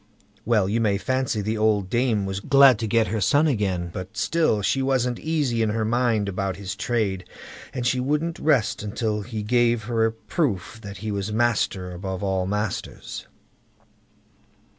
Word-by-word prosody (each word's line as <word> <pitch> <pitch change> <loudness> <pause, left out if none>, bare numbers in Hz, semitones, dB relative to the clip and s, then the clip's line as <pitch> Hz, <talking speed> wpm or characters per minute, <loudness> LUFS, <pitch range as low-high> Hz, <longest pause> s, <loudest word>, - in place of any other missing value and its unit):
Well, 105 -4 +3
you 110 +4 0
may 105 -3 +2
fancy 130 -1 -1
the 110 +2 -2
old 105 -3 +2
dame 120 -2 +1
was 95 0 -3
glad 135 +1 +6
to 115 - -2
get 115 0 +2
her 110 - -1
son 145 - +4
again, 95 - 0
but 95 +1 -7
still 155 -11 +1
she 135 - +1
wasn't 125 -2 0
easy 145 -8 0
in 110 - +2
her 110 +1 0
mind 115 -2 +1
about 95 -1 -2
his 100 0 -5
trade, 105 -4 -1 0.5
and 125 -3 -4
she 125 +1 +2
wouldn't 150 +5 -1
rest 130 -10 +1
till 110 -3 -1
he 110 0 -5
gave 120 0 +2
her 115 0 +1
a - - -2
proof 110 - -2
that 100 -2 -8
he 110 - -1
was 100 +1 -3
"master 105 -5 0
above 95 +1 -5
all 95 -1 0
masters". 105 0 -4
110 Hz, 170 wpm, -24 LUFS, 100-125 Hz, 0.5 s, glad